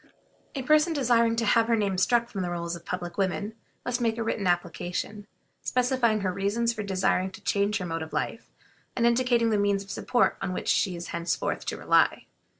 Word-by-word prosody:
A 270 Hz, -, -3 dB
person 305 Hz, +4 st, +4 dB
desiring 235 Hz, -5 st, +3 dB
to 230 Hz, 0 st, 0 dB
have 225 Hz, +2 st, +4 dB
her 235 Hz, -, +3 dB
name 200 Hz, -3 st, 0 dB
struck 235 Hz, +5 st, +2 dB
from 200 Hz, -5 st, -5 dB
the 180 Hz, -, -2 dB
rolls 170 Hz, 0 st, -3 dB
of 170 Hz, -, -11 dB
public 175 Hz, 0 st, -5 dB
women 200 Hz, +3 st, -1 dB, 0.3 s
must 245 Hz, 0 st, -1 dB
make 225 Hz, -1 st, +1 dB
a 230 Hz, -, -1 dB
written 215 Hz, -3 st, -1 dB
application, 180 Hz, +4 st, -2 dB, 0.3 s
specifying 245 Hz, -4 st, +1 dB
her 185 Hz, -2 st, -1 dB
reasons 220 Hz, +5 st, 0 dB
for 220 Hz, -, -5 dB
desiring 190 Hz, -1 st, 0 dB
to 190 Hz, -, -13 dB
change 205 Hz, +1 st, +1 dB
her 185 Hz, -, -4 dB
mode 165 Hz, -1 st, -3 dB
of 160 Hz, -, -6 dB
life, -, -, -3 dB, 0.5 s
and 235 Hz, -, +1 dB
indicating 235 Hz, -1 st, +3 dB
the 210 Hz, -, +2 dB
means 200 Hz, -1 st, +1 dB
of 200 Hz, -, -10 dB
support 245 Hz, -, +1 dB
on 190 Hz, -1 st, -2 dB
which -, -, -3 dB
she 185 Hz, -3 st, +2 dB
is 170 Hz, 0 st, -7 dB
henceforth 170 Hz, 0 st, -2 dB
to -, -, -2 dB
rely. -, -, +2 dB
205 Hz, 205 wpm, -27 LUFS, 185-235 Hz, 0.5 s, person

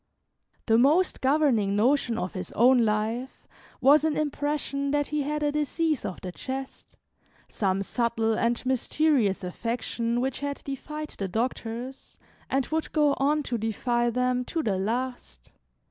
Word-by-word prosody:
The 225 Hz, 0 st, +4 dB
most 310 Hz, +9 st, +3 dB
governing 260 Hz, -8 st, +2 dB
notion 240 Hz, +1 st, +2 dB
of 185 Hz, -, -3 dB
his 185 Hz, -, -6 dB
own 245 Hz, +1 st, +5 dB
life 225 Hz, +4 st, -2 dB, 0.4 s
was 290 Hz, +3 st, +6 dB
an 315 Hz, -2 st, +1 dB
impression 290 Hz, -1 st, -1 dB
that 290 Hz, 0 st, +1 dB
he 300 Hz, -, +1 dB
had 300 Hz, +1 st, -2 dB
a 295 Hz, -, +2 dB
disease 300 Hz, 0 st, 0 dB
of 185 Hz, -, -5 dB
the 180 Hz, -, -5 dB
chest, 265 Hz, +7 st, -7 dB, 0.5 s
some 195 Hz, -1 st, -1 dB
subtle 230 Hz, 0 st, 0 dB
and 235 Hz, +3 st, 0 dB
mysterious 260 Hz, -5 st, +1 dB
affection 230 Hz, +4 st, -2 dB
which 260 Hz, +1 st, -1 dB
had 285 Hz, 0 st, -4 dB
defied 300 Hz, +2 st, -6 dB
the 195 Hz, -, -4 dB
doctors, 235 Hz, +4 st, -4 dB, 0.3 s
and 270 Hz, -1 st, +1 dB
would 315 Hz, 0 st, -2 dB
go 295 Hz, -2 st, +4 dB
on 295 Hz, +2 st, +2 dB
to 240 Hz, -4 st, -2 dB
defy 240 Hz, +2 st, 0 dB
them 250 Hz, +1 st, 0 dB
to 325 Hz, +3 st, -2 dB
the 195 Hz, -4 st, 0 dB
last. 230 Hz, -, -4 dB
255 Hz, 145 wpm, -27 LUFS, 225-290 Hz, 0.5 s, was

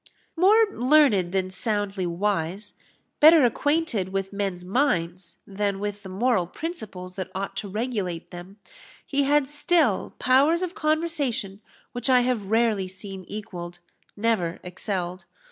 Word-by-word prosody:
More 410 Hz, +6 st, +5 dB
learned 250 Hz, -, +3 dB
than 185 Hz, -1 st, -1 dB
soundly 200 Hz, -1 st, -2 dB
wise 190 Hz, +2 st, -2 dB, 0.5 s
better 310 Hz, -2 st, +8 dB
acquainted 265 Hz, -, 0 dB
with 195 Hz, 0 st, -3 dB
men's 195 Hz, -3 st, -3 dB
minds 180 Hz, -6 st, -1 dB
than 200 Hz, 0 st, -2 dB
with 205 Hz, 0 st, -4 dB
the 195 Hz, -, -9 dB
moral 200 Hz, -1 st, +1 dB
principles 200 Hz, -, -7 dB
that 185 Hz, -1 st, -5 dB
ought 195 Hz, +1 st, -4 dB
to 205 Hz, -, -3 dB
regulate 205 Hz, -6 st, -3 dB
them, 180 Hz, +3 st, -10 dB, 0.5 s
he 280 Hz, 0 st, 0 dB
had 290 Hz, 0 st, +3 dB
still 295 Hz, -, +1 dB
powers 285 Hz, +7 st, +3 dB
of 360 Hz, -1 st, -3 dB
conversation 305 Hz, -, -1 dB, 0.3 s
which 245 Hz, +1 st, -4 dB
I 250 Hz, -1 st, +6 dB
have 240 Hz, -6 st, -1 dB
rarely 220 Hz, -4 st, +2 dB
seen 190 Hz, 0 st, -9 dB
equalled, 175 Hz, -4 st, -7 dB, 0.4 s
never 205 Hz, -6 st, 0 dB
excelled. 180 Hz, -1 st, -4 dB
205 Hz, 130 wpm, -25 LUFS, 185-265 Hz, 0.5 s, better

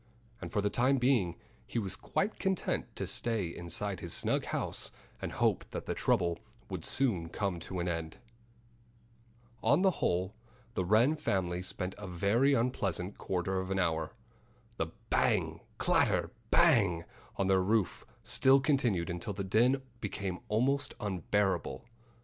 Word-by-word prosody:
And -, -, -6 dB
for 105 Hz, -, +1 dB
the 105 Hz, -, +1 dB
time 130 Hz, +3 st, +3 dB
being 120 Hz, -9 st, +2 dB, 0.3 s
he -, -, -4 dB
was 100 Hz, -5 st, -1 dB
quite 205 Hz, +3 st, -2 dB
content 190 Hz, -2 st, -1 dB
to -, -, -2 dB
stay 115 Hz, -5 st, 0 dB
inside 90 Hz, +3 st, -3 dB
his -, -, -3 dB
snug -, -, 0 dB
house -, -, -3 dB, 0.3 s
and -, -, -3 dB
hope -, -, +1 dB
that -, -, -5 dB
the -, -, -1 dB
trouble 85 Hz, -1 st, +1 dB, 0.3 s
would 90 Hz, -4 st, -4 dB
soon 100 Hz, -12 st, +2 dB
come 95 Hz, -2 st, -2 dB
to 90 Hz, +2 st, -5 dB
an 85 Hz, -, -1 dB
end. 80 Hz, -2 st, -3 dB, 1.4 s
On 145 Hz, -, +4 dB
the 190 Hz, -, +5 dB
whole, 90 Hz, +3 st, +1 dB, 0.4 s
the 95 Hz, -, 0 dB
Wren 115 Hz, -, +4 dB
family 95 Hz, -, -1 dB
spent 90 Hz, 0 st, -3 dB
a 105 Hz, -, -6 dB
very 105 Hz, +10 st, +3 dB
unpleasant 100 Hz, -6 st, -1 dB
quarter 95 Hz, +1 st, -1 dB
of 95 Hz, 0 st, -4 dB
an 95 Hz, -, 0 dB
hour. 80 Hz, -2 st, 0 dB, 0.6 s
The 80 Hz, -, 0 dB, 0.2 s
bang, -, -, +2 dB, 0.2 s
clatter, -, -, +2 dB, 0.2 s
bang 90 Hz, -7 st, +4 dB, 0.3 s
on 100 Hz, -, 0 dB
their 95 Hz, 0 st, +4 dB
roof 100 Hz, 0 st, +1 dB, 0.2 s
still 135 Hz, +1 st, +5 dB
continued 125 Hz, -, +1 dB
until 90 Hz, +3 st, -3 dB
the 100 Hz, +1 st, -3 dB
din 120 Hz, +7 st, +3 dB, 0.2 s
became 100 Hz, -4 st, -3 dB
almost 135 Hz, +6 st, +1 dB
unbearable. 95 Hz, -6 st, -1 dB
100 Hz, 150 wpm, -32 LUFS, 90-120 Hz, 1.4 s, the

